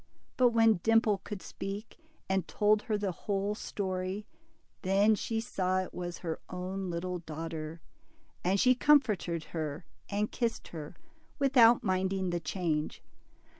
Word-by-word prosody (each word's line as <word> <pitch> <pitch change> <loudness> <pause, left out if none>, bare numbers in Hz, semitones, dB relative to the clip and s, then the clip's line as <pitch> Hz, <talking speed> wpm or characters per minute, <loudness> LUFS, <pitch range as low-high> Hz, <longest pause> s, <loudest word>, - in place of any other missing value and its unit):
But 250 -1 +5
when 225 -4 +4
Dimple 225 -2 +3
could 205 -3 -6
speak, 200 +8 -6 0.3
and 190 -3 0
told 210 0 +3
her 215 -1 -1
the 205 -2 -1
whole 200 +3 -2
story, 190 -1 -3 0.6
then 200 +3 +4
she 225 +1 -1
saw 185 -5 0
it - - -10
was 175 -1 -4
her 165 -3 -4
own 185 +1 -4
little 180 +1 -3
daughter, 160 0 -6 0.6
and 190 +3 +2
she 255 +3 +6
comforted 225 - +3
her 155 0 -3 0.2
and 210 +1 -1
kissed 235 -2 -2
her, 155 -3 -7 0.4
without 245 -4 +6
minding 190 -1 0
the 175 - 0
change. 160 -3 -2
190 Hz, 135 wpm, -31 LUFS, 175-215 Hz, 0.6 s, she